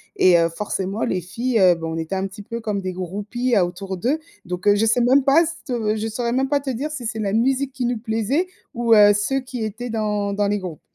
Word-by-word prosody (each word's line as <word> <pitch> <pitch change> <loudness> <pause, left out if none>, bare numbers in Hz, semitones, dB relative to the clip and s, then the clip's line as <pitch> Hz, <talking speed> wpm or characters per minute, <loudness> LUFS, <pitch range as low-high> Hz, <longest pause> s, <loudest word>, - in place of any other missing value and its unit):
et, 185 -1 +5
heu, 165 0 +2
forcément 195 +3 -3
les 185 - -1
filles, 230 +7 -1
heu 180 -2 +6
bah, 165 -1 -6
on 160 - -3
était 165 +3 -3
un 190 0 -1
petit 195 +2 -8
peu 230 +3 -6
comme 210 -3 -2
des 185 -1 -3
groupies 205 +7 -3
à 190 -4 +4
autour 190 +2 -6
d'eux. 250 - 0 0.3
Donc, 180 +2 -4
heu, 205 - +6
je 210 +2 +2
sais 225 +3 +3
même 260 +3 +4
pas 285 +6 +5
se 240 -9 -2
je 220 +1 -2
saurais 235 +2 -2
même 265 +1 +1
pas 285 0 +2
te 275 -1 -4
dire 265 +5 -3
si 290 -6 -6
c'est 225 0 -3
la 200 -2 -1
musique 265 +4 +1
qui 255 -2 -3
nous 240 -1 -1
plaisait 230 - 0 0.3
ou 235 -1 +3
heu, 205 -1 +7
ceux 240 +7 0
qui 250 -3 -5
étaient 225 +3 -5
dans 210 -2 -1
dans 205 0 +1
les 205 +1 +1
groupes. 180 -6 -7
220 Hz, 260 wpm, -22 LUFS, 195-245 Hz, 0.3 s, heu